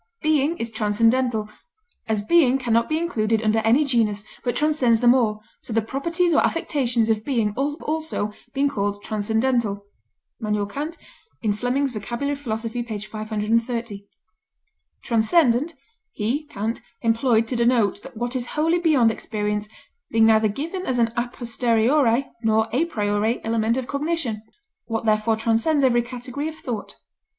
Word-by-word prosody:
"Being 310 Hz, +1 st, +2 dB
is 230 Hz, 0 st, -4 dB
transcendental.... 225 Hz, +1 st, +1 dB, 0.6 s
As 215 Hz, -2 st, 0 dB
being 270 Hz, 0 st, +4 dB
can 245 Hz, -4 st, -1 dB
not 230 Hz, +1 st, +2 dB
be 310 Hz, -, +1 dB
included 225 Hz, -10 st, 0 dB
under 220 Hz, +1 st, +2 dB
any 230 Hz, +7 st, +3 dB
genus, 215 Hz, -6 st, +1 dB, 0.2 s
but 245 Hz, -, -1 dB
transcends 295 Hz, -7 st, +2 dB
them 240 Hz, 0 st, +6 dB
all, 215 Hz, -4 st, +1 dB, 0.2 s
so -, -, -11 dB
the 225 Hz, -, +3 dB
properties 335 Hz, -, 0 dB
or -, -, +5 dB
affections 250 Hz, -8 st, +1 dB
of 220 Hz, -1 st, +1 dB
being 230 Hz, -6 st, +1 dB
have 275 Hz, +7 st, -2 dB
also 310 Hz, -9 st, -2 dB, 0.2 s
been 275 Hz, +2 st, +1 dB
called 205 Hz, -6 st, -2 dB
transcendental." 220 Hz, -1 st, 0 dB, 0.6 s
K. 215 Hz, -, -3 dB
F. 210 Hz, -, +1 dB, 1.0 s
Vocab. 250 Hz, +3 st, -2 dB
Philos. 225 Hz, -4 st, -3 dB
p. 245 Hz, -, -2 dB
530. 215 Hz, 0 st, -2 dB, 1.0 s
"Transcendent 250 Hz, +5 st, +2 dB, 0.4 s
he 250 Hz, +9 st, -1 dB
[Kant] 225 Hz, -4 st, -3 dB, 0.2 s
employed 230 Hz, 0 st, +3 dB
to 245 Hz, -, -4 dB
denote 235 Hz, -3 st, +2 dB, 0.2 s
what 240 Hz, +3 st, -3 dB
is 245 Hz, -1 st, -2 dB
wholly 330 Hz, +3 st, +2 dB
beyond 290 Hz, -9 st, +4 dB
experience, 210 Hz, -1 st, -3 dB, 0.4 s
being 225 Hz, 0 st, +4 dB
neither 220 Hz, -1 st, +5 dB
given 320 Hz, -, -4 dB
as 255 Hz, -, 0 dB
an 230 Hz, -1 st, +2 dB
a 240 Hz, +1 st, 0 dB
posteriori 240 Hz, +2 st, +1 dB, 0.2 s
nor 220 Hz, -1 st, +2 dB
a 270 Hz, +8 st, +2 dB
priori 210 Hz, -4 st, 0 dB
element 225 Hz, +1 st, +1 dB
of 260 Hz, -, -2 dB
cognition 280 Hz, -6 st, -2 dB, 0.4 s
what 225 Hz, -1 st, -3 dB
therefore 215 Hz, +1 st, +2 dB
transcends 230 Hz, +7 st, +1 dB
every 240 Hz, -2 st, +4 dB
category 250 Hz, +4 st, -5 dB
of 315 Hz, -, -6 dB
thought." 240 Hz, -8 st, -6 dB
235 Hz, 140 wpm, -23 LUFS, 220-275 Hz, 1.0 s, them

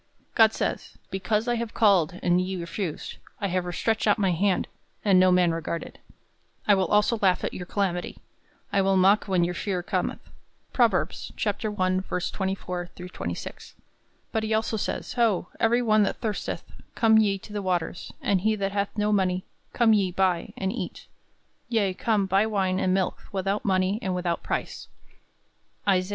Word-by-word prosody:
God 220 Hz, -1 st, +6 dB
says, -, -, -3 dB
"Because 210 Hz, +4 st, 0 dB
I 240 Hz, 0 st, +1 dB
have 230 Hz, -1 st, -4 dB
called, 185 Hz, -6 st, +3 dB
and 175 Hz, 0 st, +3 dB
ye 190 Hz, +1 st, -3 dB
refused; 170 Hz, 0 st, -5 dB, 0.2 s
I 200 Hz, -, -1 dB
have 180 Hz, 0 st, 0 dB
stretched 220 Hz, +3 st, 0 dB
out 205 Hz, -, +4 dB
my 195 Hz, -4 st, +2 dB
hand, 185 Hz, +2 st, +1 dB, 0.4 s
and 195 Hz, -3 st, +6 dB
no 185 Hz, 0 st, +5 dB
man 180 Hz, -1 st, +4 dB
regarded;... 165 Hz, 0 st, -4 dB, 0.7 s
I 205 Hz, -, +7 dB
also 210 Hz, +4 st, +3 dB
will -, -, -16 dB
laugh 185 Hz, -2 st, +3 dB
at -, -, -2 dB
your 180 Hz, -, -6 dB
calamity; 180 Hz, -3 st, -2 dB, 0.6 s
I 200 Hz, -, +4 dB
will 195 Hz, 0 st, +3 dB
mock 195 Hz, +3 st, +4 dB
when 185 Hz, -3 st, +2 dB
your 175 Hz, +1 st, 0 dB
fear 180 Hz, 0 st, -2 dB
cometh." -, -, -2 dB, 0.5 s
Prov. -, -, +5 dB
I:24 185 Hz, -3 st, -2 dB
26. -, -, -6 dB, 0.6 s
But 220 Hz, -, 0 dB
he 220 Hz, 0 st, 0 dB
also 220 Hz, +1 st, 0 dB
says, 210 Hz, -, -3 dB
"Ho, 225 Hz, -7 st, +1 dB
every 235 Hz, +2 st, +3 dB
one 215 Hz, -2 st, +4 dB
that 200 Hz, -, +1 dB
thirsteth, 215 Hz, -3 st, -3 dB, 0.3 s
come 220 Hz, -1 st, +5 dB
ye 200 Hz, -2 st, +2 dB
to 205 Hz, +2 st, -12 dB
the 205 Hz, -, -2 dB
waters, 180 Hz, -1 st, -2 dB
and 190 Hz, -3 st, +2 dB
he 215 Hz, +2 st, +2 dB
that 200 Hz, -1 st, -2 dB
hath 200 Hz, 0 st, 0 dB
no 210 Hz, 0 st, +1 dB
money; 185 Hz, -2 st, +1 dB, 0.3 s
come 230 Hz, -2 st, +4 dB
ye, 195 Hz, -3 st, +2 dB
buy, 180 Hz, -2 st, 0 dB
and 190 Hz, +1 st, -1 dB
eat; -, -, -6 dB, 0.6 s
yea, 210 Hz, -5 st, +1 dB
come, 210 Hz, 0 st, +1 dB
buy 195 Hz, +3 st, +2 dB
wine 190 Hz, -3 st, 0 dB
and 185 Hz, -, +1 dB
milk 190 Hz, 0 st, 0 dB
without 195 Hz, +1 st, -1 dB
money 190 Hz, +1 st, +1 dB
and 185 Hz, -1 st, -1 dB
without 175 Hz, -2 st, -1 dB
price." -, -, -4 dB, 1.0 s
Isa. 185 Hz, -1 st, +2 dB
195 Hz, 170 wpm, -26 LUFS, 185-210 Hz, 1.0 s, I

